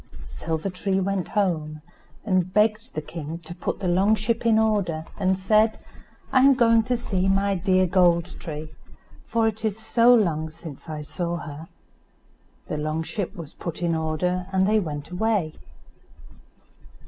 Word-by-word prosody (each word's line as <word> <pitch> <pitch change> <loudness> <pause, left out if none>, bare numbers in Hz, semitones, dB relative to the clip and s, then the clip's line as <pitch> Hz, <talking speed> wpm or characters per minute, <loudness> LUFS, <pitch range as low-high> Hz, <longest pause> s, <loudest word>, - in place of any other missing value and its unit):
Silver 165 +4 -4
tree 190 +1 -1
went 195 -2 -1
home, 155 -7 -1 0.4
and 185 -3 +1
begged 215 +3 +1
the 155 - -3
king 160 0 -6
to 170 - -7
put 175 - -3
the 190 - -2
long 190 +5 +3
ship 225 +3 -1
in 220 -1 +5
order, 200 -8 +1
and 190 -1 +2
said, 215 +3 +3 0.5
"I 260 - +5
am 270 +1 +6
going 230 -2 +5
to 250 -1 0
see 190 -5 -1
my 195 +1 +2
dear 185 0 +2
Gold 175 -2 +3
tree, 155 -1 -7 0.6
for 225 -1 +2
it 220 0 -3
is 215 -2 -1
so 230 +2 +4
long 165 -9 +2
since 160 -1 -10
I 155 -1 -5
saw 170 +3 -3
her." 155 0 -8 1.0
The 150 - -4
long 155 +2 -2
ship 200 +3 -4
was 165 -5 -9
put 170 0 -6
in 170 -1 +1
order, 165 +3 -1
and 190 0 +2
they 215 +1 +4
went 150 -4 -5
away. 185 -4 0
185 Hz, 160 wpm, -24 LUFS, 160-215 Hz, 1.0 s, am